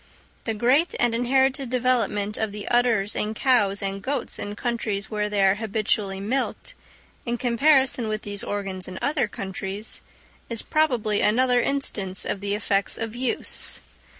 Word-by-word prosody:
The 225 - -1
great 260 +10 +3
and 240 -1 +3
inherited 265 +2 +2
development 230 -5 +1
of 220 -2 -1
the 205 0 -7
udders 235 -4 +2
in 215 +1 -1
cows 205 -6 +2
and 195 0 -2
goats 270 +2 -2
in 205 0 -4
countries 220 -3 -2
where 210 -1 -1
they 205 -2 +3
are 190 - +5
habitually 210 -2 0
milked, 260 - -2 0.5
in 240 -1 -2
comparison 260 0 +3
with 215 0 -2
these 205 -1 -5
organs 195 -2 -4
in 185 0 -7
other 285 -5 +1
countries, 195 +1 -6 0.5
is 230 -2 -3
probably 245 -9 +1
another 245 +3 +4
instance 205 -9 -2
of 200 - -2
the 200 0 0
effects 200 -1 0
of 225 0 -4
use. 250 0 -1
220 Hz, 150 wpm, -25 LUFS, 200-250 Hz, 0.5 s, are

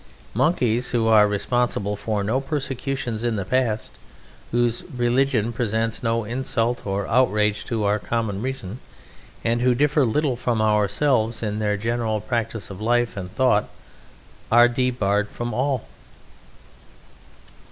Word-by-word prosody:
Monkeys, 125 - +1
who 115 -2 +1
are 110 -2 +6
responsible 105 0 0
for 105 0 -2
no 115 +7 0
persecutions 135 -5 -3
in 120 -2 0
the 100 -3 -3
past, 115 -1 -1 0.5
whose 120 0 0
religion 120 -2 +1
presents 115 -1 -1
no 115 -1 0
insult 120 0 -2
or 100 0 -1
outrage 105 -4 +2
to 115 -3 -2
our 105 +1 +2
common 105 -1 -2
reason, 125 -4 -5 0.6
and 115 +1 +1
who 125 0 +3
differ 150 +2 +3
little 130 +3 +1
from 120 -2 -1
ourselves 110 +3 +1
in 105 -1 -2
their 105 -1 0
general 115 0 -1
practice 115 -1 -3
of 95 +1 -9
life 120 +1 +1
and 90 -2 -7
thought, 125 -6 +2 0.8
are 120 +1 +7
debarred 120 -5 0
from 120 -1 -5
all! 130 +1 -1
115 Hz, 130 wpm, -23 LUFS, 105-125 Hz, 0.8 s, are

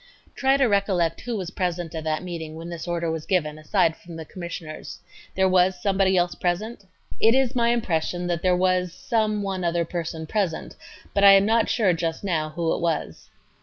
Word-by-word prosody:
Q. - - -29
Try 270 0 +3
to 275 - +3
recollect 195 -6 +1
who 240 -2 -3
was 185 -2 -5
present 175 -2 -3
at 160 -1 -4
that 155 +2 -1
meeting 165 -3 -6
when 165 +1 -7
this 170 0 -6
order 170 -1 -1
was 160 -1 -5
given, 155 -5 0
aside 160 +1 +1
from 170 0 -12
the 160 -1 -7
Commissioners. 170 -2 -7 0.4
There 190 0 +3
was 185 0 +3
somebody 190 0 +2
else 175 0 +2
present? 205 +6 -2 0.4
A. - - +5
It 225 - +5
is 265 -1 +2
my 235 -1 +3
impression 180 -6 -1
that 175 -1 -1
there 180 -1 +3
was 185 -1 +1
some 215 -2 0
one 190 -2 -3
other 170 0 +1
person 165 -1 -4
present, 185 -1 -2 0.4
but 200 - +1
I 200 0 +10
am 195 0 +6
not 225 +1 +2
sure 205 -7 +3
just 165 +1 -3
now 160 -5 -1
who 165 +1 -1
it - - -3
was. 165 -3 -2
180 Hz, 205 wpm, -24 LUFS, 165-200 Hz, 0.4 s, I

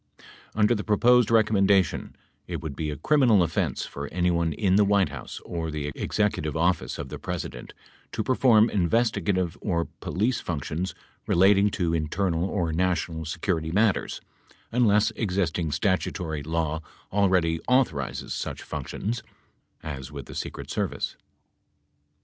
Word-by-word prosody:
Under 105 +2 +4
the 105 -2 -2
proposed 120 +2 +4
recommendation 100 -5 +3 0.3
it - - -4
would 75 -3 -6
be 75 +1 -3
a 75 - -4
criminal 120 - +4
offense 85 - -1
for 70 0 -6
anyone 85 0 +1
in 95 +4 +1
the 105 - +6
White 100 -4 +3
House 70 -4 -7
or 85 -2 -3
the 75 -1 -3
Executive 80 -8 -1
Office 85 +1 +1
of 70 -2 -6
the - - -7
Presi - - -4
dent - - -11 0.4
to 110 - -2
perform 120 -3 +5
investigative 95 -2 +1
or 85 -5 0
police 110 +6 0
functions 85 +3 -3 0.3
relating 100 +3 +5
to 85 -4 -1
internal 85 +2 0
or 90 -5 -1
national 85 -2 -1
security 80 0 -2
matters, 105 +2 +1 0.5
unless 110 -2 +3
existing 90 -7 -1
statutory 80 -2 -1
law 80 +1 -2 0.3
already 90 -5 +2
au 130 +1 +6
thorizes 70 - -5
such - - -4
functions 115 +3 -4 0.6
(as 70 -4 -6
with - - -7
the - - -10
Secret - - -6
Service). - - -2
90 Hz, 140 wpm, -26 LUFS, 80-105 Hz, 0.6 s, the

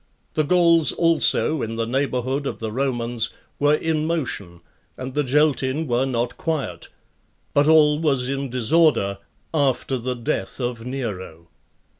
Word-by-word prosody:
The 155 - +1
Gauls 170 0 +4
also, 160 -2 +2
in 115 0 -3
the 115 0 -1
neighborhood 130 +2 -1
of - - -4
the 110 -1 -5
Romans, 120 -2 -1 0.3
were 145 +1 +4
in 155 0 -1
motion, 115 - -3 0.4
and 130 0 -6
the 150 - +1
Geltin 145 +1 +1
were 125 0 0
not 120 -2 -2
quiet; 140 - -3 0.7
but 145 +1 +3
all 150 -1 +5
was 135 -6 +1
in 135 0 -3
disorder 120 -5 +2 0.3
after 135 -3 0
the 125 +2 -3
death 115 -3 -3
of 120 -2 -3
Nero. 95 -10 -6
130 Hz, 140 wpm, -22 LUFS, 120-150 Hz, 0.7 s, all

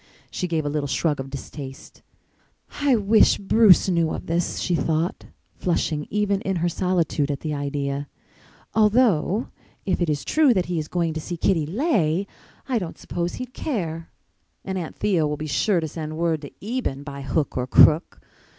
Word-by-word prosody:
She 180 - -2
gave 160 -3 -1
a - - 0
little 145 -1 -2
shrug 145 +3 0
of 135 0 -5
distaste. 135 0 -9 0.8
"I 280 -3 +4
wish 215 0 +4
Bruce 200 -2 +5
knew 170 -3 +2
of - - -5
this," 170 +1 -1
she 180 - -1
thought, 165 +2 -1 0.3
flushing 155 -4 -1
even 200 -1 0
in 195 - -1
her 175 0 +1
solitude 170 -5 0
at 140 - -3
the 155 -2 -3
idea. 140 0 -3 0.7
"Although 215 -2 +3 0.4
if 190 - 0
it 175 - +1
is 145 -3 -1
true 300 -6 +4
that 185 -2 +1
he 175 -2 -2
is 155 - -4
going 170 -2 -1
to 160 - -4
see 175 +2 -5
Kitty 165 -3 +1
Leigh 195 - +1 0.4
I 250 -4 +1
don't 180 -5 -6
suppose 175 0 -3
he'd 255 0 -7
care. 165 - -3 0.6
And 190 - -3
Aunt 175 -4 -4
Theo 175 -7 +1
will 150 0 -2
be 155 - -5
sure 175 +6 +1
to 160 - -2
send 155 0 -6
word 165 -2 0
to 145 +6 -12
Eben 215 - -3
by 140 -1 -7
hook 140 +2 -1
or 125 0 -1
crook. 155 +6 +5
165 Hz, 180 wpm, -23 LUFS, 150-195 Hz, 0.8 s, Bruce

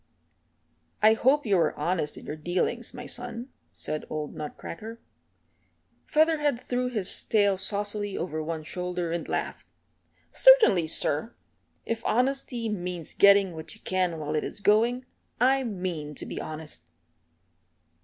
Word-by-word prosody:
"I 215 +1 +8
hope 265 +5 +2
you 200 -4 +3
are - - +1
honest 170 -4 -1
in - - -11
your 150 - -5
dealings, 180 +9 -1
my 245 0 -8
son," 245 +1 -1 0.2
said 155 - -4
old 150 -1 -4
Nutcracker. 210 +8 -7 1.1
Featherhead 305 -4 +2
threw 250 0 -2
his 210 -6 0
tail 205 -3 +3
saucily 205 +1 -2
over 155 -2 -3
one 160 0 -4
shoulder 180 +1 -3
and 170 -1 -3
laughed. - - -3 0.6
"Certainly, 445 - +6
sir, 160 +7 -2 0.5
if 230 0 -3
honesty 250 -1 0
means 180 -5 -4
getting 200 -2 +5
what 160 +5 -9
you 220 - -20
can 185 -3 0
while 150 -1 -4
it 155 - 0
is - - -5
going, 230 +5 +2 0.3
I 265 +2 +3
mean 180 - -4
to - - -5
be - - -5
honest." 155 - -8
200 Hz, 135 wpm, -27 LUFS, 165-240 Hz, 1.1 s, I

